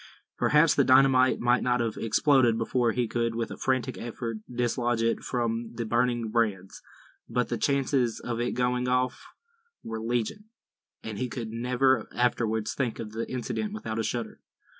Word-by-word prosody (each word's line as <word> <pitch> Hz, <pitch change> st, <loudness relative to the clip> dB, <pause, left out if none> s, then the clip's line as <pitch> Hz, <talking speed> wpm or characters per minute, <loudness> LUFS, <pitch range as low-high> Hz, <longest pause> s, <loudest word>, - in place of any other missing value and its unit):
Perhaps 150 Hz, +1 st, +4 dB
the -, -, +3 dB
dynamite 130 Hz, -1 st, +5 dB
might 120 Hz, +1 st, +2 dB
not 125 Hz, 0 st, +1 dB
have 115 Hz, -2 st, -1 dB
exploded 120 Hz, 0 st, +3 dB
before 115 Hz, +1 st, +1 dB
he 120 Hz, 0 st, -1 dB
could 115 Hz, 0 st, -1 dB
with 115 Hz, -1 st, -3 dB
a -, -, -7 dB
frantic 130 Hz, 0 st, -1 dB
effort 115 Hz, -1 st, -5 dB
dislodge 120 Hz, -1 st, 0 dB
it 115 Hz, -, +1 dB
from 115 Hz, -1 st, -3 dB
the 115 Hz, -, -3 dB
burning 120 Hz, 0 st, 0 dB
brands; 105 Hz, -5 st, -1 dB, 0.5 s
but -, -, 0 dB
the -, -, -1 dB
chances 135 Hz, -4 st, +1 dB
of 120 Hz, -1 st, -4 dB
its 120 Hz, +1 st, -2 dB
going 125 Hz, 0 st, +1 dB
off 125 Hz, 0 st, 0 dB, 0.6 s
were 115 Hz, 0 st, -5 dB
legion, 120 Hz, -, -2 dB, 0.6 s
and 110 Hz, -2 st, -6 dB
he 125 Hz, -, -2 dB
could 115 Hz, -3 st, -5 dB
never 125 Hz, +1 st, +1 dB
afterwards 115 Hz, -3 st, 0 dB
think 125 Hz, -5 st, -2 dB
of 110 Hz, -2 st, -6 dB
the 115 Hz, +1 st, -5 dB
incident 130 Hz, -, -3 dB
without 115 Hz, -, -4 dB
a -, -, 0 dB
shudder. 115 Hz, 0 st, -4 dB
120 Hz, 165 wpm, -27 LUFS, 115-125 Hz, 0.6 s, dynamite